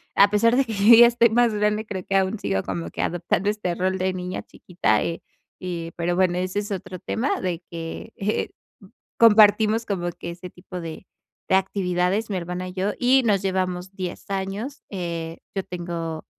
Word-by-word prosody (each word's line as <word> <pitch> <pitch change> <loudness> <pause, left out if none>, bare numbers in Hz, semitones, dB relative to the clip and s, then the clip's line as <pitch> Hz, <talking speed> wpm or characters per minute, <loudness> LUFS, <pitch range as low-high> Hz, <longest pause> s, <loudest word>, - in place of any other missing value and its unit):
A 200 0 +6
pesar 230 +3 +3
de 270 - +4
que 230 - -7
yo 210 +3 +7
ya 235 +1 +9
estoy 235 0 +4
más 235 0 +3
grande, 210 +1 0
creo 190 -4 -6
que 195 - -2
aún 195 +2 +1
sigo 95 -1 -1
como 85 -3 -4
que - - -5
adoptando 175 +3 0
este 210 -5 -2
rol 185 +1 0
de 185 0 0
niña 180 0 -5
chiquita, 110 - -1
eh, 170 - -3 0.4
eh, 170 -2 -5
pero 175 +1 0
bueno, 180 -1 +2
ese 185 +2 -1
es 205 0 -5
otro 185 -1 -5
tema, 225 +7 -1
de 180 -2 -2
que, 165 -1 -7
eh, 210 +2 -1 0.7
compartimos 220 0 +6
como 175 -5 -2
que 170 - -7
ese 180 +1 -9
tipo 180 0 -9
de 165 +2 -8 0.4
de 190 - +5
actividades 190 +2 0
mi 190 - -1
hermana 180 +1 -4
y 180 - -10
yo, 195 +2 -1
y 260 +2 +4
nos 205 -4 +2
llevamos 185 -1 -2
10 185 0 -6
años. 195 +8 -4
Eh, 170 -3 -5
yo 195 - -1
tengo 170 -2 -5
185 Hz, 190 wpm, -24 LUFS, 175-210 Hz, 0.7 s, ya